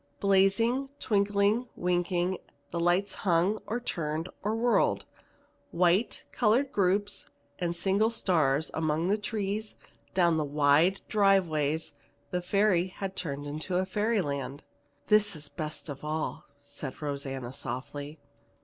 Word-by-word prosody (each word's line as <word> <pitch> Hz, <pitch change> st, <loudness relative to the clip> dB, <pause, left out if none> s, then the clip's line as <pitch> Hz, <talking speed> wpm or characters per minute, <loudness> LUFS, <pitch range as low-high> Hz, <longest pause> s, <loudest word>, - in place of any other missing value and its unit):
Blazing, 200 Hz, +7 st, +3 dB
twinkling, 205 Hz, +2 st, +2 dB
winking, 180 Hz, +1 st, 0 dB, 0.3 s
the 170 Hz, -, -2 dB
lights 175 Hz, +4 st, +2 dB
hung 185 Hz, +3 st, +2 dB
or 235 Hz, +3 st, -1 dB
turned 160 Hz, -7 st, -3 dB
or 210 Hz, +2 st, 0 dB
whirled. 235 Hz, +1 st, +2 dB, 0.6 s
White, 180 Hz, +5 st, +2 dB
colored 245 Hz, +4 st, +2 dB
groups, 200 Hz, +1 st, +1 dB, 0.3 s
and 175 Hz, -1 st, -1 dB
single 195 Hz, +5 st, +2 dB
stars, 160 Hz, -9 st, +1 dB
among 160 Hz, +2 st, 0 dB
the 205 Hz, -, +3 dB
trees, 210 Hz, 0 st, -3 dB, 0.4 s
down 170 Hz, -3 st, +4 dB
the 155 Hz, -, +1 dB
wide 150 Hz, +6 st, +3 dB
drive 195 Hz, -3 st, +4 dB
ways, 155 Hz, 0 st, -1 dB, 0.4 s
the 180 Hz, -, 0 dB
Ferry 190 Hz, -1 st, +2 dB
had 190 Hz, +1 st, -6 dB
turned 145 Hz, -4 st, -4 dB
into 170 Hz, +6 st, -1 dB
fairyland. 175 Hz, -, -1 dB, 0.4 s
"This 210 Hz, -3 st, +4 dB
is 150 Hz, -1 st, -7 dB
the -, -, -31 dB
best 155 Hz, +1 st, -4 dB
of 145 Hz, -2 st, -7 dB
all," 155 Hz, +1 st, -3 dB
said 145 Hz, -1 st, -7 dB
Rosanna 135 Hz, -4 st, -4 dB
softly. 140 Hz, +3 st, -5 dB
180 Hz, 125 wpm, -29 LUFS, 150-205 Hz, 0.6 s, down